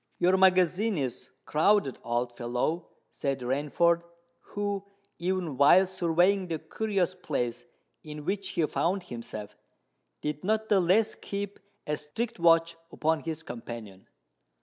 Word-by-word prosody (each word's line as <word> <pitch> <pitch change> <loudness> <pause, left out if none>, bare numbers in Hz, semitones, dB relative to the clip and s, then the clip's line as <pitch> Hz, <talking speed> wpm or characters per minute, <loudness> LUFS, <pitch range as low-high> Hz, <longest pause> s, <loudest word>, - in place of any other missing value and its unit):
"Your 180 +2 +4
magazine 190 +2 +4
is 130 -4 -4 0.2
crowded, 160 -2 +2
old 120 +1 -1
fellow," 125 +8 -2 0.2
said 135 -2 -2
Rainford, 150 +7 +2 0.4
who, 205 -1 -3 0.4
even 175 -5 -1
while 145 +7 +7
surveying 185 +1 +2
the 165 -2 -2
curious 195 0 -1
place 125 -9 -3 0.4
in 150 -1 -8
which 195 +2 -1
he 165 - +1
found 180 +5 0
himself, 115 - -8 0.7
did 150 0 -3
not 220 +2 0
the 205 - +5
less 190 +5 +3
keep 200 0 -5 0.3
a 150 - 0
strict 220 +9 -4
watch 165 0 +4 0.2
upon 160 0 +1
his 160 0 -5
companion. 115 - -8
170 Hz, 125 wpm, -28 LUFS, 140-190 Hz, 0.7 s, while